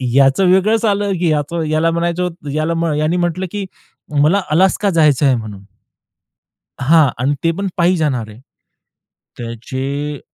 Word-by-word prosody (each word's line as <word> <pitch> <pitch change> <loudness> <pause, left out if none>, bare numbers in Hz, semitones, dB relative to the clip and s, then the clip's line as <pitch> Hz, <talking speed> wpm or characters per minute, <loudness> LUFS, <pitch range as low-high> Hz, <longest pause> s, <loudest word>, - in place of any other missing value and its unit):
याचं 140 +7 +4
वेगळच 215 +4 +2
आलं, 205 -1 0
की 175 -2 +1
याच 150 +2 -2 0.2
याला 160 +2 +2
म्हणायचं 170 +1 -1
होत 165 -5 -6
याला 165 +1 -1
यानी 155 +4 0
म्हटलं, 175 +2 -1
की 205 -2 -4 0.6
"मला 185 +7 +3
अलास्का 190 +4 +2
जायच 150 -5 +3
आहे," 135 -2 +4
म्हणून. 105 -4 -7 1.2
हां 155 +2 +5 0.2
आणि 145 +2 +1
ते 165 - +3
पण 200 - -1
पायी 175 +1 +2
जाणार 130 -8 -1
आहे. 105 +3 -13 1.0
त्याचे 135 +5 -5
160 Hz, 145 wpm, -17 LUFS, 140-180 Hz, 1.2 s, हां